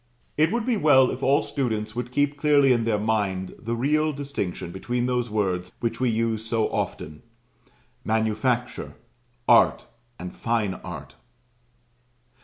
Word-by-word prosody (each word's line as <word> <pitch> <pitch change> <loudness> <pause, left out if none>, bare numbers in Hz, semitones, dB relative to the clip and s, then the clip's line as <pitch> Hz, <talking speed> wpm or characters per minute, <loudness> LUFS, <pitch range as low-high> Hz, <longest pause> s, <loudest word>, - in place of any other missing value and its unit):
It 155 +3 +3
would 235 -1 -1
be 245 -3 +1
well 135 -7 +5
if 130 - -6
all 140 +1 +3
students 110 -5 -2
would 125 0 -4
keep 145 +2 +1
clearly 145 -2 +4
in 115 -2 0
their 110 -2 +1
mind 105 -4 -1
the 115 +1 -3
real 155 +5 +1
distinction 140 - -4
between 120 +6 -2
those 125 -1 0
words 95 -4 -1
which 115 -1 -2
we 130 -1 +2
use 115 -1 0
so 115 -1 0
often, 75 0 -4 0.8
"Manufacture," 110 +3 -1 0.5
"Art," 120 - +5 0.3
and 90 0 -8
"Fine 115 -4 0
Art." 75 -6 -8
115 Hz, 140 wpm, -25 LUFS, 105-135 Hz, 0.8 s, well